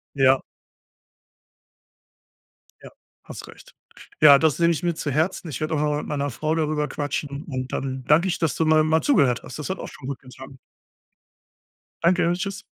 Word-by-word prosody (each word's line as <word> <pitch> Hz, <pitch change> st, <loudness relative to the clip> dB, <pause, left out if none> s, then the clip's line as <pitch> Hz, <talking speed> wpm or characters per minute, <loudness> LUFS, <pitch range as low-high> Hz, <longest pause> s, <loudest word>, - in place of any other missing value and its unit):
Ja. 135 Hz, -1 st, +4 dB, 2.4 s
Ja, -, -, -11 dB, 0.3 s
hast -, -, -10 dB
recht. -, -, -16 dB, 0.5 s
Ja, 145 Hz, -2 st, +9 dB
das 160 Hz, -3 st, +2 dB
nehme 170 Hz, 0 st, +4 dB
ich 160 Hz, -, -4 dB
mir 170 Hz, -2 st, 0 dB
zu 145 Hz, -, -3 dB
Herzen. 160 Hz, +5 st, -1 dB
Ich 150 Hz, -, -6 dB
werd 155 Hz, +1 st, -2 dB
auch -, -, +1 dB
noch -, -, +1 dB
mal 145 Hz, -, 0 dB
mit -, -, -7 dB
meiner 145 Hz, -1 st, -2 dB
Frau 155 Hz, +6 st, -2 dB
darüber 150 Hz, -2 st, -1 dB
quatschen, 145 Hz, 0 st, -4 dB
und 130 Hz, -3 st, -5 dB
dann 130 Hz, -1 st, -4 dB
danke 165 Hz, +5 st, +4 dB
ich, 180 Hz, -, -2 dB
dass 160 Hz, -6 st, 0 dB
du 160 Hz, -, 0 dB
mal 155 Hz, 0 st, +4 dB
mal 160 Hz, +1 st, +2 dB
zugehört 140 Hz, -, +2 dB
hast. 130 Hz, -, -9 dB
Das 150 Hz, -, -5 dB
hat 190 Hz, -, -2 dB
auch -, -, -6 dB
schon 130 Hz, -, -11 dB
gut 140 Hz, -1 st, -5 dB
getan. 130 Hz, +1 st, -13 dB, 1.5 s
Danke. 175 Hz, 0 st, +3 dB
Tschüss. 195 Hz, +1 st, -5 dB
150 Hz, 185 wpm, -23 LUFS, 140-165 Hz, 2.4 s, Ja